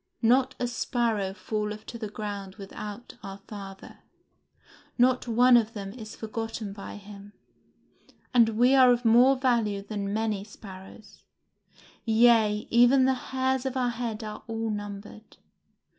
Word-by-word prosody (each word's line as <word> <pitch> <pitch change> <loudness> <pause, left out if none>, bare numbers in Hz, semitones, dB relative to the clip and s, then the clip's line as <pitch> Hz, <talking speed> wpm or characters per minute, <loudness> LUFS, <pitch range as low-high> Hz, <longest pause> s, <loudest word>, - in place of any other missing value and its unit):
Not 250 +3 +3
a 245 - 0
sparrow 235 -4 -1
falleth 210 +1 -4
to 235 - -8
the 215 -2 -5
ground 200 -2 -6
without 210 +3 -9
our 195 -2 -8
Father. 195 -1 -11 1.0
Not 250 0 +3
one 245 +2 +5
of 230 -1 +2
them 195 -2 -6
is 220 -3 -9
forgotten 225 -2 -5
by 200 -1 -8
him; 205 0 -12 1.0
and 235 -2 +5
we 250 +3 +5
are 260 -2 +7
of 245 0 0
more 245 +4 +6
value 230 -6 0
than 200 -1 -4
many 215 -2 -1
sparrows; 195 0 -13 0.8
yea, 220 -2 +3
even 245 +3 +5
the 265 - +3
hairs 260 0 -1
of 265 0 -3
our 250 -1 +1
head 230 -2 -4
are 215 0 -7
all 225 -1 -3
numbered. 205 +1 -8
220 Hz, 140 wpm, -27 LUFS, 205-245 Hz, 1.0 s, are